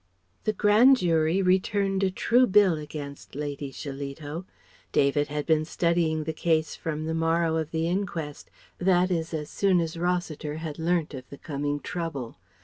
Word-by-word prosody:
] 90 +2 -42
The 215 - +2
Grand 215 +7 +6
Jury 165 -1 +2
returned 195 +1 +2
a 195 - +3
true 245 +6 +3
bill 200 -3 +5
against 150 -3 -8
Lady 145 -1 -4
Shillito. 145 +4 -6 0.5
David 145 +1 +2
had 150 0 -3
been 155 -1 +3
studying 165 -1 +1
the 160 +1 -3
case 160 0 0
from 155 -1 -4
the 160 - -2
morrow 165 0 +1
of 160 -1 -2
the 160 0 -1
inquest, 170 -5 -3 0.3
that 185 0 +3
is 165 -2 -1
as 155 -2 -4
soon 195 -3 +3
as 165 0 -2
Rossiter 175 -4 -2
had 160 -1 -6
learnt 165 -1 0
of 130 -1 -8
the 140 - -10
coming 145 -1 -3
trouble. 160 -8 -5
160 Hz, 165 wpm, -27 LUFS, 150-180 Hz, 0.5 s, Grand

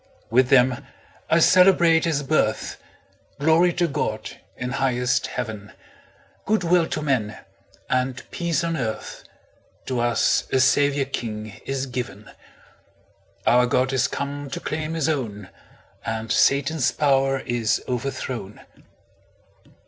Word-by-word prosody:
With 125 +2 +4
them 130 -2 +4 0.5
I 160 - +4
celebrate 170 -2 +5
His 150 -3 0
birth 135 -6 0 0.6
Glory 160 +5 +4
to 175 0 +1
God, 145 - -3 0.3
in 125 0 -4
highest 125 -2 0
Heaven, 110 -4 -6 0.7
Good 215 -2 +1
will 170 -1 +3
to 155 - -3
men, 110 -7 -1 0.5
and 130 0 -1
peace 170 -2 -1
on 165 0 -1
earth, 110 -6 -4 0.6
To 125 -2 -2
us 120 -1 +1
a 130 - +3
Saviour 140 +1 +3
king 110 -5 -6
is 135 -1 -2
given; 120 -5 -6 1.1
Our 125 +1 +4
God 130 +2 +1
is 130 +1 +2
come 140 0 -5
to - - -5
claim 155 +1 -4
His 160 -4 0
own, 110 - -3 0.5
And 110 0 -4
Satan's 140 0 +2
power 135 -2 +2
is 120 -3 0
overthrown! 125 -4 -4
135 Hz, 120 wpm, -23 LUFS, 120-155 Hz, 1.1 s, celebrate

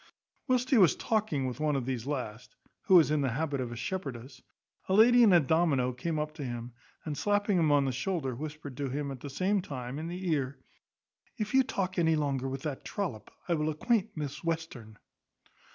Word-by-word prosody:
Whilst 255 -1 +1
he 255 - +6
was 180 -6 +6
talking 210 - 0
with 130 +2 -4
one 150 -1 +1
of 135 -3 -1
these 130 -2 -3
last 125 -6 -5 0.3
(who 190 - +6
was 160 -4 +6
in 150 -1 +2
the 135 - +1
habit 140 +2 -1
of 120 -2 -4
a - - -5
shepherdess) 135 -4 -5 0.5
a 190 - +3
lady 245 +3 +7
in 220 -4 +7
a 175 - +7
domino 140 -4 +2
came 155 +6 -3
up 150 0 -2
to 155 -2 -7
him, 120 -1 -5 0.3
and 150 -2 -3
slapping 205 +3 +1
him 155 -3 +3
on 145 -1 +4
the 135 - 0
shoulder, 135 +1 -2
whispered 145 0 -7
him, 140 +1 -2
at 135 - -7
the 145 - -7
same 190 +8 +1
time, 130 -5 -6
in 160 - -4
the 180 +2 -5
ear, 140 -3 -1 0.8
"If 215 -2 -3
you 265 - +6
talk 190 -7 -2
any 160 -1 +3
longer 135 -3 -1
with 135 0 -5
that 145 -4 -4
trollop, 170 - -4 0.2
I 175 - +2
will 155 -1 0
acquaint 205 +6 0
Miss 145 0 -5
Western." 160 -10 -4
150 Hz, 205 wpm, -30 LUFS, 130-180 Hz, 0.8 s, lady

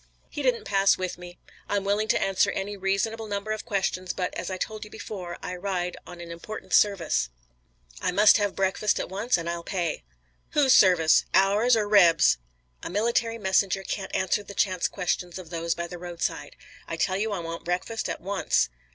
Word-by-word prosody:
"He 295 - -4
didn't 255 -3 +1
pass 195 -1 +3
with 185 -1 -4
me. 175 0 -11 0.3
I'm 205 -1 0
willing 205 +2 0
to - - +2
answer 195 -1 +2
any 205 +2 -3
reasonable 200 +3 -1
number 205 +1 -3
of 215 0 -3
questions, 190 -4 -1
but, 180 -1 -3
as - - -4
I 185 - -3
told 215 +3 -4
you 210 - -10
before, 180 -5 -7
I 180 - -4
ride 180 -1 -2
on 175 - -10
an 170 -1 -8
important 170 +6 -8
service. 180 - +3 0.7
I - - 0
must 210 +4 +6
have 205 -2 -1
breakfast 195 +2 +1
at - - -4
once, 205 +5 0
and 170 -1 -5
I'll 170 0 -3
pay." 170 - -2 0.5
"Whose 275 -3 +5
service? 175 -5 +5
Ours 205 +6 +4
or 210 -1 0
Reb's?" 170 - +5 0.4
"A - - -5
military 230 +4 0
messenger 195 -1 +1
can't 190 0 -4
answer 190 +2 +1
the 200 0 -11
chance 185 -3 +1
questions 180 -1 -3
of 180 -3 -10
those 170 0 -1
by 170 - -3
the 175 0 -8
roadside. 175 -1 -4 0.3
I 165 - -4
tell 185 +3 0
you 215 +2 -1
I 200 - -1
want 165 -1 -6
breakfast 180 +6 -2
at - - -4
once." 190 - +1
195 Hz, 195 wpm, -26 LUFS, 175-210 Hz, 0.7 s, must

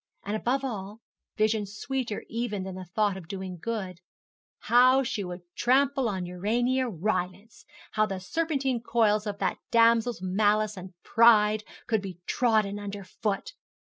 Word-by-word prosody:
And 205 +2 -3
above 255 +5 0
all, 210 -3 -5 0.4
vision 215 -1 +1
sweeter 240 +2 -4
even 225 -4 -3
than 190 0 -6
the 185 0 -7
thought 210 -3 +2
of 175 -4 -10
doing 190 -1 -6
good, 195 -6 -4 0.6
how 255 +3 +5
she 215 -4 -2
would 180 0 -6
trample 270 0 +2
on 190 -3 -3
Urania 240 +8 0
Rylance 195 +2 -3 0.3
how 215 0 +2
the 195 -2 -4
serpentine 270 - -1
coils 220 -3 +2
of 205 -1 -3
that - - -1
damsel's 230 0 +4
malice 210 +3 +1
and 185 -1 -10
pride 215 -2 +5 0.2
could 220 -3 +1
be 190 -3 -7
trodden 215 -4 +1
under 205 -1 -6
foot! 215 - -3
215 Hz, 145 wpm, -27 LUFS, 195-235 Hz, 0.6 s, how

